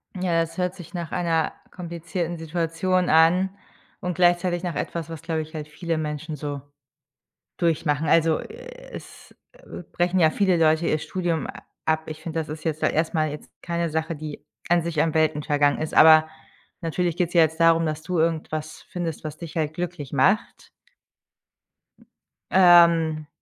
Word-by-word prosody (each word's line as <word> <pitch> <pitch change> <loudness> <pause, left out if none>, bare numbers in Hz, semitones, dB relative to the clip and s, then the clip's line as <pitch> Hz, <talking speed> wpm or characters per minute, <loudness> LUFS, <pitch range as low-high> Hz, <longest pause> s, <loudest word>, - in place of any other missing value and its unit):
Ja, 175 -2 +1
das 165 +3 -5
hört 180 0 -1
sich 180 0 -12
nach 170 -3 -5
einer 165 -2 0 0.2
komplizierten 170 0 -5
Situation 170 +3 -1
an 170 +4 +4 0.5
und 180 -2 -3
gleichzeitig 175 0 +2
nach 170 -5 -3
etwas, 165 +1 -4
was, 165 -3 -7
glaube 160 -1 -2
ich 155 +1 -10
halt 150 -1 -6
viele 165 +1 -3
Menschen 155 0 -4
so 145 -1 -5 1.0
durchmachen. 160 -2 0
Also, 165 0 +3
äh - - -11 0.2
es, - - -12 0.2
äh, - - -11
brechen 180 +1 +1
ja 160 -1 +5
viele 190 -2 +2
Leute 160 0 +3
ihr 155 - +1
Studium 175 0 -2
a - - -9 0.3
ab. 160 0 0
Ich 155 0 -7
finde, 165 -1 -3
das 155 - -6
ist 155 +1 -7
jetzt 155 -1 -2
ja - - +4
erstmal 155 -1 0
jetzt 150 - -9
keine 170 -1 -2
Sache, 160 +1 -2
die 150 -1 -8 0.2
an 175 -1 +3
sich 165 -2 -2
am 160 -1 -1
Welten 155 -2 +1
vergangen 145 -1 +2
ist, 155 - -4
aber 155 0 +7 0.5
natürlich 170 0 -1
geht's 175 -2 -1
ja 170 - +7
jetzt 160 +1 0
darum, 165 0 +4
dass 155 0 -3
du 180 +1 -2
irgendwas 155 -1 -2
findest, 170 -4 -4
was 155 -1 -6
dich 170 -1 -9
halt 155 -1 0
glücklich 175 -6 -5
macht. 190 - +1 1.8
Ähm. 170 -4 +5
165 Hz, 170 wpm, -24 LUFS, 155-175 Hz, 1.8 s, aber